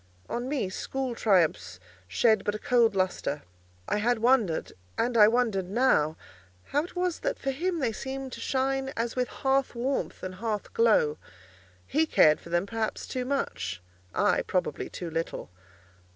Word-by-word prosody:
On 240 +2 -3
me 275 -9 0
school 260 +7 -3
triumphs 165 - +1 0.3
shed 215 - +3
but 205 - -1
a - - -2
cold 230 -2 +3
lustre. 185 -6 -1 0.4
I - - +1
had 235 +3 +2
wondered—and 220 - 0
I 210 -2 +8
wondered 220 -6 +1
now—how 160 - 0
it 350 - -10
was 360 -1 -1
that - - -2
for 270 - -2
him 345 +6 -1
they 260 -7 0
seemed 265 +3 -5
to 235 - -7
shine 270 +2 0
as 230 0 -1
with 250 -1 0
hearth 270 -1 0
warmth 260 +3 -2
and 185 0 -4
hearth 210 +1 -4
glow. 210 -10 +3 0.7
He 315 +3 +1
cared 155 - +5
for - - -12
them 175 +2 +1
perhaps 220 +1 -3
too 255 -1 -3
much; 250 - -2 0.3
I, - - +2
probably, - - -2
too 175 -2 -6
little. 165 - -4
230 Hz, 155 wpm, -28 LUFS, 185-265 Hz, 0.7 s, I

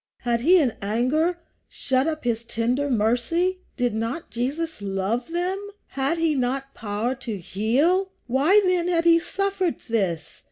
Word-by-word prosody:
Had 240 -1 +1
he 350 +8 +6
in 270 -9 +2
anger 255 - +1 0.3
shut 265 +2 0
up 310 -1 -2
his 235 -2 -1
tender 240 +5 -1
mercy? 250 - +1 0.2
Did 245 -3 +1
not 230 +10 -3
Jesus 285 +4 -3
love 200 +5 -2
them? 360 +3 -1 0.3
Had 275 +4 -1
he 325 -1 +2
not 270 +1 -2
power 220 +3 -2
to 240 -5 -5
heal? 265 - +1 0.2
Why 280 - +4
then 360 -1 +2
had 340 -2 +1
he 335 0 +6
suffered 385 -1 -1
this? 180 -9 -2
265 Hz, 150 wpm, -24 LUFS, 230-335 Hz, 0.3 s, he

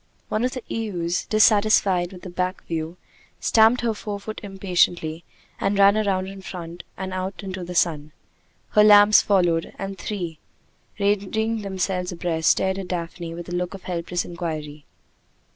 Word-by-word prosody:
One 215 - 0
of 250 - 0
the 255 -3 -6
ewes, 180 -6 -2
dissatisfied 205 -4 +4
with 185 -1 -12
a - - -5
back 185 +1 -2
view, 165 +1 -4 0.4
stamped 225 +2 +4
her 230 -2 0
forefoot 210 0 -6
impatiently, 180 -5 0 0.4
and 195 +1 0
ran 200 0 +7
round 195 -3 0
in 195 0 -9
front, 175 -2 -8 0.2
and 190 0 -5
out 185 +2 -4
into 190 -1 -5
the 180 +1 -7
sun. 155 -3 +1 0.6
Her 210 - +5
lambs 205 0 +8
followed, 175 -5 +1
and 195 0 -5
the 170 - -11
three, 175 -7 -4 0.6
ranging 210 +2 0
themselves 190 -2 -2
abreast, 170 -2 0
stared 190 0 +2
at 190 - -6
Daphne, 170 -1 -5
with 170 0 -8
a 175 - -3
look 180 +2 -2
of 195 - -11
helpless 175 0 -3
inquiry. 155 -4 -6
185 Hz, 160 wpm, -23 LUFS, 175-205 Hz, 0.6 s, lambs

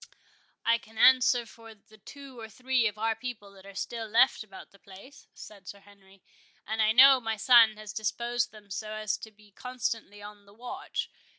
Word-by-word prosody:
"I 230 0 +3
can 220 0 -19
answer 250 0 +4
for 225 0 -15
the 215 +1 -23
two 270 +3 -13
or 225 -1 -9
three 255 0 0
of 210 -1 -6
our 225 +1 0
people 230 -6 -8
that 195 0 -17
are 200 - -13
still 230 +2 -5
left 230 +2 +3
about 195 -3 -14
the 200 - -22
place," 200 +10 -16
said 200 -3 -14
Sir 200 - -9
Henry; 195 -1 -22 0.4
"and 220 +1 -2
I 215 0 +3
know 265 +3 +7
my 225 -1 -3
son 225 -1 +5
has 215 -1 -9
disposed 240 +3 -2
them 210 -2 -17
so 215 +3 -5
as 215 0 -2
to 220 - -10
be 210 -1 -23
constantly 230 -3 -5
on 205 0 -13
the 200 - -19
watch. 245 +2 -6
220 Hz, 195 wpm, -28 LUFS, 205-240 Hz, 0.4 s, know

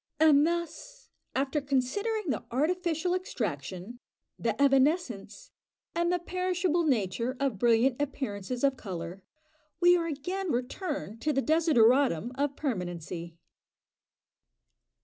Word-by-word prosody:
And 305 -1 +6
thus, 345 +9 -5 0.2
after 275 +2 0
considering 305 - -1
the - - -3
artificial 340 +5 0
extraction, 210 - -4 0.4
the 225 -2 -1
evanescence, 275 - +1 0.4
and 345 +1 +1
the 360 - +2
perishable 360 -1 0
nature 235 -1 0
of 270 -8 -1
brilliant 240 +4 +3
appearances 250 -4 -3
of 275 -1 +3
colour, 180 -3 -6 0.6
we 350 0 +6
are 335 -1 0
again 355 +5 -3
returned 250 - -3
to 305 - +1
the 270 - +1
desideratum 260 - +3
of 280 +1 -1
permanency. 175 - -4
275 Hz, 110 wpm, -29 LUFS, 230-340 Hz, 0.6 s, And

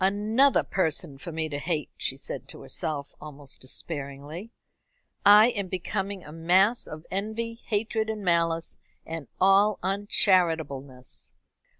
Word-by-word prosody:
"Another 215 +8 +3
person 160 -5 -1
for 170 - -7
me 160 0 -2
to 145 -2 -4
hate," 155 -2 -2
she - - -2
said - - -6
to - - -8
herself, 145 -3 -3
almost 145 -2 -9
despairingly. 145 - -6 0.7
"I 210 +3 +8
am 205 -5 -3
becoming 190 +1 -3
a 150 - -10
mass 185 +8 +3
of 155 +1 -9
envy, 220 +4 -3
hatred, 220 0 -1
and 215 -2 -3
malice, 165 -1 +1 0.3
and 165 -4 -6
all 195 +2 +5
uncharitableness." 165 - +1
180 Hz, 125 wpm, -27 LUFS, 155-205 Hz, 0.7 s, I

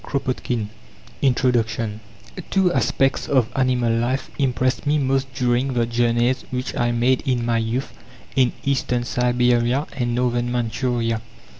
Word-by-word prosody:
KROPOTKIN 125 -5 -2 0.5
1902 140 - +3
INTRODUCTION 115 -4 +1 0.5
Two 190 -2 +2
aspects 135 0 +1
of 130 -5 +2
animal 125 -3 +2
life 120 +4 -1
impressed 130 0 0
me 150 +1 +3
most 135 -1 0
during 125 +1 +1
the 120 -1 +2
journeys 120 +2 +1
which 125 0 -3
I 120 0 +1
made 125 +2 +2
in 125 -4 -1
my 115 -1 +1
youth 115 +4 -2 0.4
in 130 -2 +4
Eastern 125 -3 0
Siberia 125 +2 +1
and 120 -2 -1
Northern 120 -1 0
Manchuria. 120 -1 -1
125 Hz, 135 wpm, -22 LUFS, 120-130 Hz, 0.5 s, in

